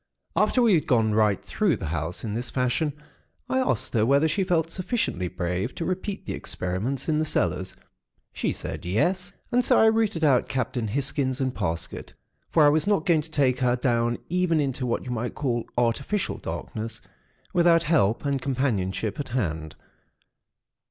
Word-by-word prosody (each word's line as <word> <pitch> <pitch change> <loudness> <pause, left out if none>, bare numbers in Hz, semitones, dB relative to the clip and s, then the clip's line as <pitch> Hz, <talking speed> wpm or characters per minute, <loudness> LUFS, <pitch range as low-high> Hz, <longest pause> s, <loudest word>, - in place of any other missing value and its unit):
"After 250 - +3
we 225 -4 +5
had 160 - +2
gone 110 -4 +3
right 105 -3 +3
through 190 - +1
the - - -5
house 80 +1 -3
in 110 -3 -3
this 120 +2 -3
fashion, 130 +5 0 0.5
I 260 - +1
asked 260 - 0
her 110 -3 +3
whether 140 +6 +4
she 170 +6 0
felt 165 -3 +1
sufficiently 185 - -1
brave 90 +5 -3
to 165 - -3
repeat 185 +2 -3
the - - -3
experiments 105 +10 -3
in 155 -1 +2
the - - +2
cellars. 95 - -1 0.6
She - - -1
said, - - -6
yes; 180 - 0 0.2
and 245 +1 +3
so - - +4
I - - +6
rooted 220 -7 +2
out 135 -5 +4
Captain 125 -3 -1
Hisgins 130 +2 -1
and 130 -2 0
Parsket; 80 -1 -4 0.4
for 155 -3 +5
I - - +7
was 155 +5 +2
not 200 -6 +2
going 165 -4 +4
to 155 - -8
take 135 -5 +2
her 125 -1 +2
down 120 -1 +1
even 180 -2 +1
into 135 -3 -1
what 120 - -1
you 125 - -4
might 120 0 -3
call 120 -5 -1
artificial 120 - 0
darkness, 110 +1 -5 0.5
without 170 -1 +5
help 145 -8 +2
and 140 -2 0
companionship 115 -6 -1
at 145 - -4
hand. 80 -11 -2
130 Hz, 175 wpm, -25 LUFS, 110-165 Hz, 0.6 s, I